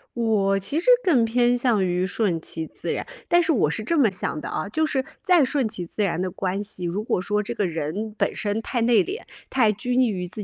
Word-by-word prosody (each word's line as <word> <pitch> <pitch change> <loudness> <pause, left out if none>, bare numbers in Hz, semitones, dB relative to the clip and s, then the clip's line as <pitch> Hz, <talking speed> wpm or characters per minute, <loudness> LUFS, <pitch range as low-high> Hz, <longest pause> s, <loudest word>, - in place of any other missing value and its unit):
我 210 -4 +2
其 285 +11 -1
实 350 - -8 0.2
更 290 - +4
偏 240 +2 +2
向 240 -6 +2
于 180 0 0
顺 185 -3 -1
其 160 0 -3
自 - - -6
然， - - -3 0.2
但 345 0 +4
是 325 -1 +2
我 205 - +2
是 215 +8 -3
这 335 - 0
么 260 -7 +5
想 180 -4 -2
的 - - -6
啊， 155 - -3
就 315 +10 -1
是 265 -4 -1 0.2
再 355 -7 +5
顺 265 -2 0
其 185 -5 -5
自 210 +5 -3
然 180 -4 -1
的 185 0 -2
关 190 +2 -2
系， 200 -3 -1
如 185 +5 -2
果 200 - 0
说 210 +2 -1
这 235 - -4
个 205 -5 0
人 170 +7 -4
本 - - 0
身 205 0 -1
太 240 +1 -2
内 230 -1 +4
敛， 395 +5 -5 0.3
太 230 -5 +3
拘 245 +4 -3
泥 255 -1 +4
于 180 -3 -3
自 205 +4 -7
215 Hz, 265 characters per minute, -24 LUFS, 185-245 Hz, 0.3 s, 么